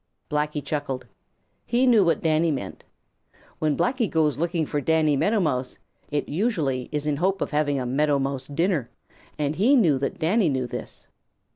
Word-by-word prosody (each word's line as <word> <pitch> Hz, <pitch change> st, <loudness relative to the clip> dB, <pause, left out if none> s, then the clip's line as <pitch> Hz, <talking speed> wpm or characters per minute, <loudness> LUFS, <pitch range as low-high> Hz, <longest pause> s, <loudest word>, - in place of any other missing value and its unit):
Blacky 150 Hz, -1 st, -1 dB
chuckled. 140 Hz, -3 st, -3 dB, 0.6 s
He 245 Hz, +2 st, +1 dB
knew 235 Hz, -5 st, +5 dB
what 170 Hz, -2 st, +1 dB
Danny 160 Hz, +1 st, +2 dB
meant. 140 Hz, -4 st, -4 dB, 0.8 s
When 155 Hz, -2 st, 0 dB
Blacky 250 Hz, -3 st, +1 dB
goes 155 Hz, -3 st, +1 dB
looking 170 Hz, -1 st, 0 dB
for 145 Hz, 0 st, -2 dB
Danny 155 Hz, 0 st, +2 dB
Meadow 210 Hz, +10 st, +2 dB
Mouse, 130 Hz, -8 st, -1 dB, 0.3 s
it 145 Hz, 0 st, -2 dB
usually 150 Hz, -, -1 dB
is 150 Hz, -1 st, -2 dB
in 150 Hz, -2 st, 0 dB
hope 190 Hz, +4 st, +1 dB
of -, -, -2 dB
having 145 Hz, -2 st, +1 dB
a 125 Hz, -, -3 dB
Meadow 145 Hz, +3 st, +2 dB
Mouse 135 Hz, -1 st, -3 dB
dinner, 160 Hz, -3 st, 0 dB, 0.5 s
and 150 Hz, 0 st, -1 dB
he 240 Hz, +10 st, +4 dB
knew 165 Hz, -, +4 dB
that 140 Hz, -, -2 dB
Danny 175 Hz, +3 st, +2 dB
knew 130 Hz, -2 st, -1 dB
this. 120 Hz, -, -8 dB
150 Hz, 170 wpm, -24 LUFS, 140-175 Hz, 0.8 s, knew